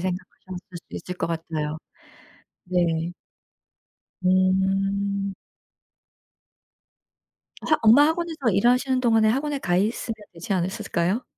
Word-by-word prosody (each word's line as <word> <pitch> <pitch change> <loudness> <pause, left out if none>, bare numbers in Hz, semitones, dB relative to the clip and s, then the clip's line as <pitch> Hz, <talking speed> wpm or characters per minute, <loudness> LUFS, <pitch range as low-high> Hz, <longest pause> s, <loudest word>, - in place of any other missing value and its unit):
생각하셨을 185 0 -6
수 - - -7
있을 180 - -6
것 - - -1
같아요. 160 -2 -3 0.9
네. 175 -2 0 1.1
음. 195 +2 +1 2.3
학 310 - +3
엄마 250 +7 +7
학원에서 320 -6 -1
일하시는 250 +6 +2
동안에 225 -3 +4
학원에 280 +5 0
가 175 -8 0
있으면 220 +4 -1 0.2
되지 170 +3 -5
않으셨을까요? 185 +3 -1
195 Hz, 225 characters per minute, -24 LUFS, 180-235 Hz, 2.3 s, 엄마